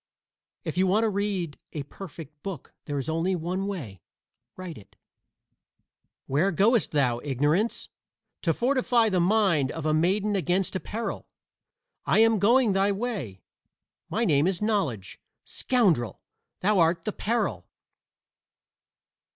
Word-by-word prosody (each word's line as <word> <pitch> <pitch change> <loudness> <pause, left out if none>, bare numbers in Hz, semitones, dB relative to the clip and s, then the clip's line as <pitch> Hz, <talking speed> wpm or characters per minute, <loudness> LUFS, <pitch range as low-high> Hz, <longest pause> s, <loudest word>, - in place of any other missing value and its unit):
If - - -5
you 190 - +4
want 210 +5 +3
to 225 - +2
read 195 -6 -2
a 150 - -3
perfect 155 -2 -11
book 190 -8 -7
there 145 -1 -3
is 135 - -3
only 165 +4 0
one 180 +3 -2
way: 125 - -6 0.6
write 185 -3 -7
it. 100 - -19 1.3
"Where 150 +9 +2
goest 215 +6 +3
thou, 130 -5 +1
Ignorance?" 145 - 0 0.5
"To 165 - +2
fortify 245 - +2
the 185 -3 +1
mind 175 -7 +2
of 165 -2 -6
a 155 - +2
maiden 195 +6 +1
against 185 0 0
a - - 0
peril." 225 +4 -5 0.8
"I - - +2
am 225 -1 +5
going 235 +1 +4
thy 195 +1 +2
way. 195 - -4 0.7
My 230 +3 0
name 150 -3 +3
is 190 -2 0
Knowledge." 190 - -1 0.3
"Scoundrel! 175 - +1 0.4
Thou 200 +1 +3
art 165 0 +2
the 215 - -2
peril." 200 - -1
185 Hz, 135 wpm, -26 LUFS, 150-210 Hz, 1.3 s, am